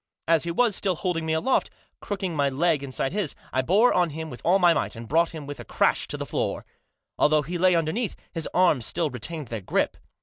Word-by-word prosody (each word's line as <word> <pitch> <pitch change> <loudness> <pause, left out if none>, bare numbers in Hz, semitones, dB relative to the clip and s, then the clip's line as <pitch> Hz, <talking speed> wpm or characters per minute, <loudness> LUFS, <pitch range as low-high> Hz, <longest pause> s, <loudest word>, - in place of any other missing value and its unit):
As 165 0 +3
he - - -2
was 215 +4 +2
still 190 -1 0
holding 165 -2 -2
me 160 - +1
aloft, 210 +12 +1 0.3
crooking 195 -5 -4
my 140 -2 +2
leg 150 +2 +1
inside 135 -1 -2
his, 200 -7 -2 0.2
I 130 - +2
bore 200 - +4
on 175 -2 +2
him 160 +1 -6
with 125 - -9
all 180 +3 +4
my 175 -3 +5
might, 160 - -2
and 115 0 -8
brought 165 +5 +3
him 155 -3 -8
with 145 0 -7
a - - -6
crash - - +1
to - - -4
the - - -4
floor. - - -2 0.5
Although 150 0 +4
he 175 +4 -4
lay 185 0 +4
underneath, 170 +8 -1 0.2
his 165 -2 -4
arms 165 -10 +3
still 160 -4 -1
retained 145 +5 -5
their 115 -3 -4
grip. 95 - 0
165 Hz, 230 wpm, -25 LUFS, 145-180 Hz, 0.5 s, my